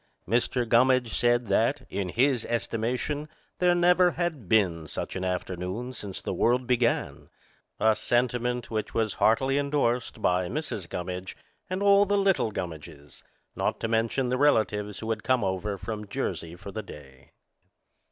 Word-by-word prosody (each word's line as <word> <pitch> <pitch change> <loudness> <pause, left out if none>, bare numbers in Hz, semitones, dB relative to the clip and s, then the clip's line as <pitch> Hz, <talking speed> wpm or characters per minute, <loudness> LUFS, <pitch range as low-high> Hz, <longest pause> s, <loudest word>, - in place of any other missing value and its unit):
Mr. 120 +3 +1
Gummidge 125 0 +3
said 120 0 +2
that, 115 +8 +1
in 95 -2 -3
his 125 +3 +2
estimation, 125 +6 -2 0.3
there 180 -1 +4
never 180 +1 +5
had 160 - -3
been 90 -7 +2
such - - -5
an 95 - -3
afternoon 90 +6 -3
since 100 -6 -6
the - - -3
world 125 +2 +2
began, 120 -1 0 0.5
a 110 -1 +4
sentiment 125 0 0
which 110 -1 -3
was 110 -2 +1
heartily 135 +5 +3
endorsed 140 -4 0
by 90 0 +1
Mrs. 110 - -4
Gummidge 90 +1 -5 0.3
and 185 +2 -2
all 200 0 +6
the 205 +1 +1
little 195 - +2
Gummidges, 75 -7 -8 0.3
not - - -1
to - - 0
mention 115 +3 0
the 125 +1 0
relatives 105 -7 +2
who 110 - -5
had 110 - -2
come 130 -3 +1
over 100 +2 -2
from 105 +1 -6
Jersey 85 -3 -4
for 100 +3 -9
the 110 - -4
day. 70 -9 -14
115 Hz, 150 wpm, -27 LUFS, 100-130 Hz, 0.5 s, all